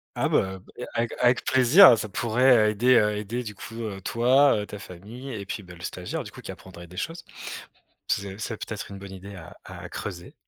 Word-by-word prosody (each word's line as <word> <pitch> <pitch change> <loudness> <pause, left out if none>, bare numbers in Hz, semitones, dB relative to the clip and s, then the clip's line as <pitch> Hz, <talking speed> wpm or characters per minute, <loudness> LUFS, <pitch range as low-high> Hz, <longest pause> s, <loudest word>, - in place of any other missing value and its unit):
Ah - - +1
bah, 95 0 0
beh 120 +6 -10
avec 115 0 -1
avec 125 0 +3
plaisir, 130 - +8
ça 110 0 -4
pourrait, 115 +1 +4
aider, 110 -1 +4
aider 105 +4 -3
du 105 -3 -7
coup, 115 +3 -10
heu, 100 -3 -5
toi, 125 +1 +3
ta 105 - -8
famille 105 +9 -9
et 100 -3 -6
puis, 100 - -5
bah 90 -2 -12
le 85 - -15
stagiaire - - -4
du - - -10
coup - - -12
qui - - -7
apprendrait 85 -2 -12
des 90 +2 -14
choses. 165 - -4 0.8
C'est 100 0 -2
c'est 110 +1 -4
peut-être 105 -2 -6
une 100 - -8
bonne 95 0 -10
idée 95 +1 -10
à 90 -4 -11
à - - -9
creuser. 90 -4 -7
105 Hz, 205 wpm, -26 LUFS, 95-120 Hz, 0.8 s, plaisir